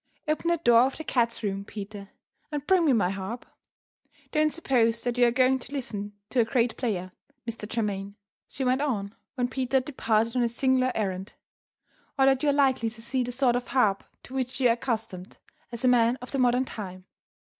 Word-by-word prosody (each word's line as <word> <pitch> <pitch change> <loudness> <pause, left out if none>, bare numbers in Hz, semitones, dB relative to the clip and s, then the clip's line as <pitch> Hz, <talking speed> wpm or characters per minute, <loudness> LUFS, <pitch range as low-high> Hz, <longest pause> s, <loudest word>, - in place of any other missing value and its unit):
"Open 310 +2 -1
the 340 - +3
door 240 -7 +5
of 260 +3 +2
the 315 - -5
cats' 235 -5 0
room, 195 -1 -2
Peter; 205 -1 -8 0.4
and 295 -1 -3
bring 365 -2 +4
me - - +5
my 205 -7 +2
harp. 195 +5 -5 0.9
Don't 305 0 +2
suppose 235 -8 +1
that 245 -1 -1
you 245 -1 +5
are - - +2
going 255 +1 +3
to 250 - -10
listen 210 -7 -4 0.2
to 255 - +1
a - - +6
great 230 0 +1
player, 185 -7 -2 0.4
Mr. 220 -2 -6
Germaine," 200 -3 -2 0.3
she 265 - -5
went 255 +1 +2
on, 210 -8 -2 0.2
when 245 -2 0
Peter 260 +1 0
had 255 - 0
departed 230 -4 0
on 250 - +2
his 235 -1 0
singular 260 -1 +2
errand, 190 -2 -3 0.8
"or 270 - +5
that 270 -1 +4
you 300 - +2
are - - +3
likely 265 -5 +2
to 225 +1 -14
see 255 +3 -1
the 245 - -4
sort 245 -1 +2
of 245 0 -2
harp 215 -7 +2 0.2
to 255 - -12
which 255 -1 -2
you 250 -2 +4
are - - +5
accustomed, 220 -6 -4 0.3
as 235 +2 -4
a - - +5
man 240 -1 +4
of 250 - -10
the 275 - -1
modern 250 +1 +3
time. 185 -6 -8
245 Hz, 210 wpm, -27 LUFS, 220-265 Hz, 0.9 s, a